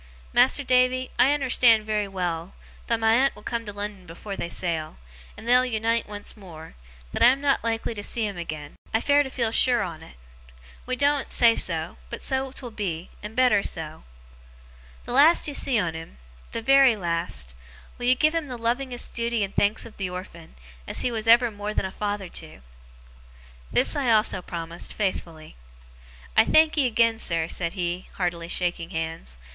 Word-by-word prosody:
Mas'r 260 +3 +4
Davy, 255 0 +2
I - - +6
unnerstan' 255 -6 +4
very 210 -1 -1
well, 175 -2 -4 0.3
though 230 - +1
my 225 0 +3
aunt 265 +4 +3
will - - -15
come 230 -2 -4
to - - -4
Lon'on 205 -3 -7
afore 195 +4 -7
they 170 - -4
sail, 165 - -2 0.4
and 230 - -11
they'll 250 +1 +5
unite 230 -2 -1
once 205 0 -7
more, 165 -6 -12 0.4
that - - -4
I - - +8
am 260 +2 +4
not 280 -1 +1
like 225 -1 -1
to 220 -3 -4
see 225 +2 -2
him 200 -1 -4
agen. 155 -4 -7 0.2
I - - +4
fare 285 +4 +3
to 275 - -3
feel 235 -4 -1
sure 245 +1 +3
on't. 160 - -8 0.7
We 255 - -1
doen't 285 +1 +1
say 230 -1 +5
so, - - 0
but - - -6
so 265 0 -1
'twill 255 -2 -7
be, 185 -6 -4
and 210 +2 -8
better 250 -5 +4
so. 160 -4 -5 1.0
The - - -7
last 300 +7 +5
you 295 - -4
see 270 -3 +2
on 175 -6 0
him 160 - -9 0.3
the 230 - -4
very 270 -1 +6
last 170 - -2 0.5
will 245 - -2
you 255 - +5
give 310 +4 +2
him 330 -3 -2
the 250 -2 -6
lovingest 245 +2 -2
duty 235 -2 0
and 195 - -5
thanks 205 +2 +2
of 230 - -13
the 195 -2 -3
orphan, 180 -2 -9 0.3
as - - -2
he 245 - 0
was 225 -1 -3
ever 235 +1 +6
more 205 0 -5
than - - 0
a 190 - -4
father 205 -1 -3
to?' 160 - -8 1.1
This - - +3
I 265 -5 +1
also 215 -4 +3
promised, 170 -1 -6
faithfully. 165 - -4 0.8
'I - - +6
thankee 310 -3 +4
agen, 230 -1 +2
sir,' 165 -5 +1
he - - -10
said, 175 +1 -2
heartily 175 -2 -2
shaking 175 -1 -1
hands. 160 - -4
215 Hz, 185 wpm, -25 LUFS, 175-250 Hz, 1.1 s, I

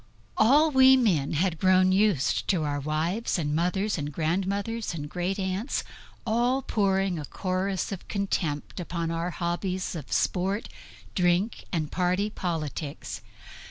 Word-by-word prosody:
All 290 +8 +5
we 265 -1 +7
men 175 - +2
had 165 +1 0
grown 185 0 +4
used 195 -8 +2
to 180 -6 +1
our 145 -1 -1
wives 160 +11 -1
and 150 -3 -1
mothers, 180 +4 0
and 145 0 -3
grandmothers, 195 +7 -1
and 145 -2 -5
great 180 +4 -2
aunts 190 +6 -2 0.4
all 245 +4 +1
pouring 195 -5 +1
a 150 - -5
chorus 185 +3 -2
of 195 - -6
contempt 185 -7 -2
upon 170 -1 -3
our 165 +1 -1
hobbies 180 +2 -2
of 155 -6 -7
sport, 195 +4 0 0.4
drink 180 +4 +1
and 155 -4 -2
party 185 +4 0
politics. 155 -6 -4
185 Hz, 135 wpm, -27 LUFS, 165-200 Hz, 0.4 s, we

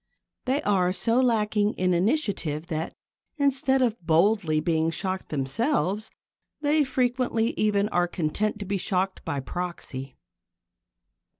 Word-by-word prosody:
They 265 +3 0
are 185 -3 +2
so 230 +6 +2
lacking 215 -3 +2
in 180 0 +1
initiative 175 - 0
that, 160 0 -3 0.4
instead 270 -2 +2
of 230 -4 0
boldly 165 0 +3
being 160 0 +1
shocked 185 +3 -2
themselves, 200 - 0 0.5
they 300 +1 +3
frequently 250 -3 0
even 210 -1 +1
are 175 -3 +1
content 180 +6 -1
to 205 - -6
be 195 0 -1
shocked 190 0 -1
by 140 - -2
proxy. 135 -5 -6
200 Hz, 120 wpm, -26 LUFS, 170-235 Hz, 0.5 s, boldly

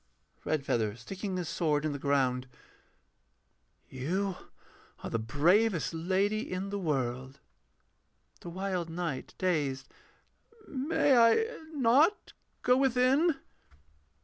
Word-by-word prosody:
REDFEATHER 120 -8 0
[sticking 190 - -5
his 175 -2 -3
sword 150 -3 0
in 155 - 0
the 140 - -5
ground]. 135 -2 +1 1.4
You 180 +9 -2 0.7
are - - -5
the 115 - 0
bravest 170 - +2
lady 195 +6 0
in 190 +2 -3
the 200 - -2
world. 130 -5 -2 1.0
THE 175 - -8
WILD 185 -1 -3
KNIGHT 165 -5 -4
[dazed]. 150 -8 -1 0.8
May 280 0 +2
I 235 - +5 0.3
not 285 - +3 0.3
go 250 0 +4
within? 270 +5 +3
180 Hz, 100 wpm, -30 LUFS, 140-225 Hz, 1.4 s, I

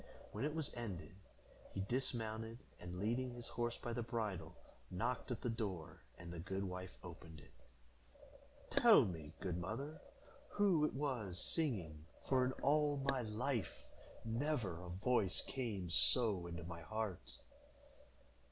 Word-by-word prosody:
When - - -1
it 150 +1 -1
was 160 -3 -2
ended, 105 -5 -5 0.6
he 95 - 0
dismounted, 115 -1 -1 0.2
and, 90 0 -6
leading 120 +6 +1
his 120 -1 -6
horse 120 0 -1
by 120 - -3
the 120 - 0
bridle, 110 -6 -2 0.3
knocked 120 +10 -1
at 120 -3 -2
the 120 - 0
door, 100 -8 -3 0.2
and 85 0 -7
the 85 - -5
good 95 +3 -2
wife 90 -1 -5
opened 85 -3 -9
it. 70 - -16 1.2
"Tell - - +8
me, 80 -5 -4
good 90 -2 -1
mother, 135 - -4 0.5
who 190 -7 +5
it - - -1
was 120 -10 -1
singing, 95 - -1 0.2
for, 130 -1 +4
in 125 - +2
all 145 +1 +4
my 135 -2 +1
life, 115 +1 -1 0.5
never 115 - 0
a 90 - -7
voice 95 +1 +2
came 105 -10 -2
so 100 -3 +5
into 85 0 -5
my 85 0 -6
heart." 110 0 -3
110 Hz, 145 wpm, -40 LUFS, 90-125 Hz, 1.2 s, Tell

